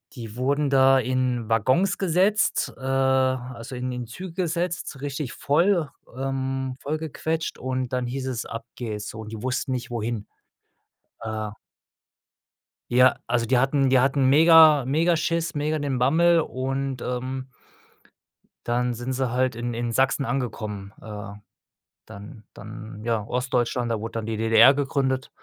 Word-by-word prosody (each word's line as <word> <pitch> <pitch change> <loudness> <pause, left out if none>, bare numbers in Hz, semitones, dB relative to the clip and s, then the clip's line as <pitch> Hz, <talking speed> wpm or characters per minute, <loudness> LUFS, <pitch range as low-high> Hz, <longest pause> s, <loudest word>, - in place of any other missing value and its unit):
Die 115 -3 -8
wurden 140 +3 0
da 135 0 +5
in 125 -2 -1
Waggons 130 - +2
gesetzt, 195 +4 +1
äh, - - -16
also 130 -2 0
in 125 +1 -3
in 125 -1 -5
Züge 180 +9 -8
gesetzt, 175 -4 -2
richtig 140 -1 -4
voll 170 +2 +1 0.3
ähm, 135 -1 -2
voll 150 +2 -2
gequetscht 160 +1 -3
und 130 -1 -3
dann 125 -1 0
hieß 130 +2 -4
es, 125 -3 -3
ab 115 0 -7
geht's, 105 -4 -5
so, 110 - -8
und 110 0 -9
die 110 -2 -7
wussten 130 +1 -2
nicht 125 0 -3
wohin, 115 -2 -3 0.9
äh 110 -1 -4 1.4
ja, 125 +1 +6
also 120 -1 0
die 130 +2 +2
hatten 135 +1 +2
die 130 -1 +5
hatten 135 +1 +2
mega, 155 0 +7
mega 160 +7 +2
Schiss, 165 0 -1
mega 155 +1 -1
den 140 -3 -1
Bammel 165 +7 +4
und, 135 -1 -3
ähm, 130 +1 -4 1.2
dann 120 +1 0
sind 120 +3 -4
sie 130 -2 -1
halt 130 -1 +1
in 120 +1 -3
in 120 0 -3
Sachsen 135 +2 +2
angekommen. 110 -7 -4
Äh, 105 -2 -7 0.8
dann 105 +1 -11
dann 110 0 -9
ja 115 -2 0
Ostdeutschland, 125 0 -1
da 115 - 0
wurde 110 +2 -6
dann 115 -1 -4
die 110 -1 -2
DDR 115 +4 +6
gegründet. 135 -2 -1
130 Hz, 150 wpm, -24 LUFS, 120-140 Hz, 1.4 s, mega